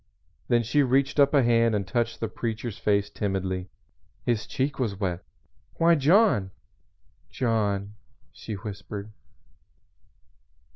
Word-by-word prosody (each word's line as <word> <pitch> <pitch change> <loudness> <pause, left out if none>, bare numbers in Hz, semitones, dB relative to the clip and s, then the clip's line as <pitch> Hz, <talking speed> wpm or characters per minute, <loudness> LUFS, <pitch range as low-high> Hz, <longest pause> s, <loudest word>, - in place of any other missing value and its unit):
Then 120 -1 +3
she 145 +6 +2
reached 135 +2 +2
up 140 0 +6
a 140 -3 +4
hand 115 -1 +3
and 100 -2 -1
touched 120 -1 -1
the 115 - 0
Preacher's 110 0 -4
face 100 -1 +1
timidly. 95 -3 -3 0.6
His 115 -3 0
cheek 135 +2 -2
was 105 -6 -2
wet. 90 -4 -2 0.5
"Why, 170 +1 +4
John 160 - +4 0.8
John!" 105 -5 -1 0.4
she 110 - -8
whispered. 100 +1 -7
115 Hz, 115 wpm, -26 LUFS, 100-130 Hz, 0.8 s, up